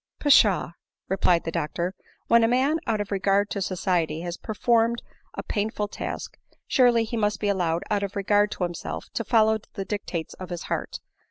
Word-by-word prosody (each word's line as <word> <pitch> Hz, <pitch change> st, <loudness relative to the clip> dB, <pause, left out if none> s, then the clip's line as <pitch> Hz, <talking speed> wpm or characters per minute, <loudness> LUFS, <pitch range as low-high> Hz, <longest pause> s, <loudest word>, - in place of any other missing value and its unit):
" -, -, -62 dB
Pshaw 220 Hz, -, +4 dB, 0.2 s
!" -, -, -54 dB
replied 180 Hz, -3 st, +3 dB
the 165 Hz, -, -3 dB
doctor; 170 Hz, +4 st, -2 dB, 0.2 s
" -, -, -37 dB
when 235 Hz, 0 st, +5 dB
a -, -, +5 dB
man 265 Hz, +7 st, +2 dB
out 220 Hz, -2 st, +1 dB
of 205 Hz, 0 st, -4 dB
regard 200 Hz, +1 st, +1 dB
to 200 Hz, -, -2 dB
society 175 Hz, -4 st, 0 dB
has 175 Hz, 0 st, -4 dB
performed 230 Hz, +2 st, +1 dB, 0.3 s
a -, -, -4 dB
painful 210 Hz, 0 st, -2 dB
task, -, -, -6 dB, 0.3 s
surely 240 Hz, -3 st, +4 dB
he 225 Hz, +1 st, -4 dB
may 210 Hz, -2 st, +3 dB
be 205 Hz, -, 0 dB
allowed, 175 Hz, -4 st, 0 dB
out 205 Hz, -1 st, +2 dB
of 200 Hz, -1 st, -4 dB
regard 205 Hz, +1 st, +2 dB
to -, -, -4 dB
himself, 175 Hz, -2 st, -4 dB
to 230 Hz, -, -2 dB
follow 220 Hz, 0 st, +3 dB
the 195 Hz, -, -4 dB
dictates 185 Hz, -5 st, -4 dB
of 185 Hz, -1 st, -9 dB
his 175 Hz, -2 st, -5 dB
heart. -, -, -3 dB
205 Hz, 195 wpm, -25 LUFS, 180-225 Hz, 0.3 s, when